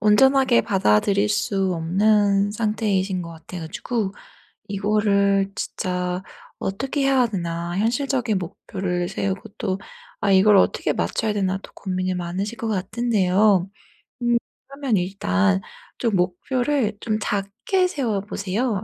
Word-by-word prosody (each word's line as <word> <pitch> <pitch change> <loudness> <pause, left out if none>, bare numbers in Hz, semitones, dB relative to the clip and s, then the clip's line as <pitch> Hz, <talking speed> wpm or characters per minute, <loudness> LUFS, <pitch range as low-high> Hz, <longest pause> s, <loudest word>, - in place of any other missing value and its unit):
온전하게 260 +4 +5
받아들일 195 - +2
수 195 -3 0
없는 200 +4 +2
상태이신 205 -4 0
것 170 - -8
같아 165 +2 -9
가지고 200 +5 -3 0.6
이거를 200 -1 +2
'진짜 180 0 -2 0.4
어떻게 270 +9 -2
해야 270 -2 +4
되나. 170 -3 -3
현실적인 245 0 +1
목표를 180 0 -3
세우고 195 0 -2 0.2
또 190 -2 -1 0.4
아 200 - +2
이걸 200 +2 +6
어떻게 - - +2
맞춰야 220 -1 -1
되나.' 190 -2 0
또 - - -12
고민이 185 -1 -2
많으실 185 +6 -3
것 230 - -3
같은데요. 200 -2 +2 0.5
음 240 0 +3 0.3
그러면 275 -4 -1
일단 95 - +1 0.4
좀 230 -4 +1
목표를 220 +6 0
좀 215 -1 0
작게 215 - 0
세워 235 - -1
보세요. 205 +2 -2
200 Hz, 270 characters per minute, -23 LUFS, 185-220 Hz, 0.6 s, 이걸